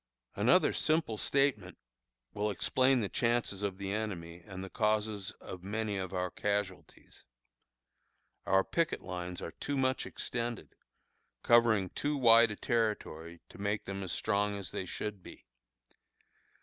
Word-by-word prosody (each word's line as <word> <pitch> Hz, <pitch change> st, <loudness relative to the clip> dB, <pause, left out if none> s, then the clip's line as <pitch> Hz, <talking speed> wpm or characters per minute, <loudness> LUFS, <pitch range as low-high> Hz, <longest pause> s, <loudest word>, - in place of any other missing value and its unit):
Another -, -, +4 dB
simple 155 Hz, -8 st, +1 dB
statement 140 Hz, +5 st, 0 dB, 0.6 s
will 105 Hz, +1 st, -1 dB
explain 130 Hz, +5 st, +2 dB
the 105 Hz, -, -1 dB
chances 115 Hz, -3 st, 0 dB
of 100 Hz, -2 st, -2 dB
the 100 Hz, -1 st, -4 dB
enemy 90 Hz, -6 st, -4 dB
and 95 Hz, 0 st, -8 dB
the 95 Hz, -, -7 dB
causes 105 Hz, -2 st, 0 dB
of 90 Hz, -, -8 dB
many 105 Hz, +2 st, -2 dB
of 95 Hz, -1 st, -4 dB
our 90 Hz, -1 st, -2 dB
casualties. 100 Hz, -3 st, -4 dB, 1.2 s
Our 95 Hz, 0 st, +4 dB
picket 165 Hz, -, 0 dB
lines 90 Hz, -1 st, -5 dB
are -, -, -5 dB
too 145 Hz, -, -4 dB
much 130 Hz, 0 st, +1 dB
extended, 120 Hz, -, -4 dB, 0.7 s
covering 115 Hz, -5 st, +4 dB
too 145 Hz, 0 st, -1 dB
wide 115 Hz, -2 st, +7 dB
a 105 Hz, -, -4 dB
territory 85 Hz, -8 st, -2 dB
to -, -, -14 dB
make 100 Hz, +1 st, -1 dB
them 95 Hz, 0 st, -4 dB
as 95 Hz, -, -4 dB
strong 105 Hz, -1 st, 0 dB
as 100 Hz, -, -6 dB
they 95 Hz, -, -4 dB
should 105 Hz, 0 st, -4 dB
be. -, -, -13 dB
105 Hz, 140 wpm, -32 LUFS, 95-115 Hz, 1.2 s, wide